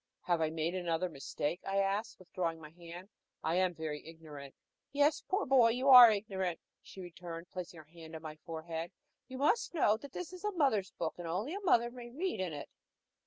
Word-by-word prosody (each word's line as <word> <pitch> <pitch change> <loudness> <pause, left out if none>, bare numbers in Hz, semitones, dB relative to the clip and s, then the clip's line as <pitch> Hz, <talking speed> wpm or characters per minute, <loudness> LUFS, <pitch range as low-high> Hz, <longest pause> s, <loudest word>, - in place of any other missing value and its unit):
"Have 175 -2 0
I 160 - +2
made 160 +2 -2
another 175 -1 -1
mistake?" 145 +3 -4
I 195 0 -2
asked, 200 +5 0
withdrawing 170 -3 -3
my 155 -1 -11
hand. 175 +3 -11 0.3
"I 160 - 0
am 185 -1 +1
very 155 -2 -5
ignorant." 155 -4 -11 0.4
"Yes, 290 +2 +2
poor 390 +2 -1
boy, 255 -3 +6
you 255 +4 +1
are 250 -2 +12
very 215 -2 +3
ignorant," 190 -4 -3 0.2
she 190 - -11
returned, 175 -1 -9
placing 180 -2 -7
her 160 - -11
hand 160 +1 -12
on 160 - -8
my 155 -1 -7
forehead. 165 +1 -6 0.4
"You 260 - -8
must 325 - +1
know 220 -9 +3
that 280 +4 -11
this 360 0 -6
is 365 - -10
a 420 0 -1
mother's 260 - +2
book, 165 - -4
and 175 - -5
only 200 - -2
a 400 - -3
mother 240 - +3
may 240 -1 -9
read 335 - -3
in 185 -3 -2
it." 145 -2 -7
180 Hz, 210 wpm, -33 LUFS, 165-240 Hz, 0.4 s, are